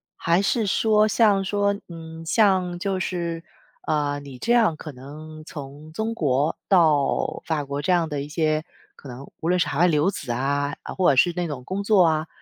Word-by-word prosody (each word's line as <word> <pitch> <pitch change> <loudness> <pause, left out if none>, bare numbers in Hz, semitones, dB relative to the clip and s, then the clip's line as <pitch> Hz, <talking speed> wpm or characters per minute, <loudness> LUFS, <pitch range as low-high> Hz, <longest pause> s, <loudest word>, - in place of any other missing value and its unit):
还 170 +1 +1
是 215 +2 +1
说 215 +2 +3
像 210 -3 +3
说， 200 +1 +1 0.2
嗯， 165 -1 -9
像 185 -4 +2
就 190 0 -2
是， 170 -3 -3 0.4
呃， 145 -2 0
你 140 -3 -10
这 235 - 0
样 220 -9 +3
可 155 - -8
能 155 +4 -11
从 145 0 -9
中 220 +4 -2
国 145 - 0
到 160 -7 +2
法 150 -3 -1
国 140 +1 -4
这 185 - 0
样 175 -2 +2
的 145 -3 -3
一 145 - -7
些， 155 0 0 0.3
可 140 - -12
能 130 +3 -10
无 165 - -1
论 180 - +3
是 155 - +2
海 145 0 -3
外 180 - +5
留 160 +4 +2
子 125 -9 -6
啊， 140 +3 -1
啊， - - -6
或 185 -4 +3
者 135 - +4
是 175 +6 +4
那 175 -1 -1
种 140 -5 -6
工 190 +8 -3
作 200 -3 +5
啊， 160 0 +1
160 Hz, 215 characters per minute, -23 LUFS, 145-190 Hz, 0.4 s, 外